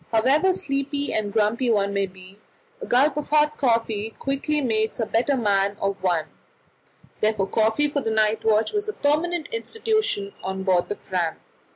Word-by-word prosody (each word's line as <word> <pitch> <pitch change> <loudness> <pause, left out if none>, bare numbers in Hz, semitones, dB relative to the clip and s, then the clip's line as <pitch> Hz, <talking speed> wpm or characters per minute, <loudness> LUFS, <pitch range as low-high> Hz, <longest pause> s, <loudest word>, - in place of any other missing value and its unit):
However 270 +11 +3
sleepy 280 -4 -2
and 210 -2 -1
grumpy 225 +4 +1
one 200 -3 +1
may 200 -1 0
be, 185 +1 -14 0.4
a 465 - -6
gulp 275 +4 +3
of 300 - -4
hot 300 0 +3
coffee 225 -4 0
quickly 275 +2 -1
makes 220 -5 0
a 225 - +1
better 250 +6 +1
man 200 -3 +1
of 195 -1 -2
one; 175 -4 +1 0.9
therefore 215 -2 +1
coffee 220 +8 +1
for 285 -1 -2
the 225 - -2
night 220 0 +1
watch 220 - +2
was 415 0 -1
a - - -3
permanent 315 +2 0
institution 435 - -1
on 190 0 -3
board 185 -2 +2
the 205 - -2
Fram. 180 -5 -2
225 Hz, 170 wpm, -24 LUFS, 200-290 Hz, 0.9 s, However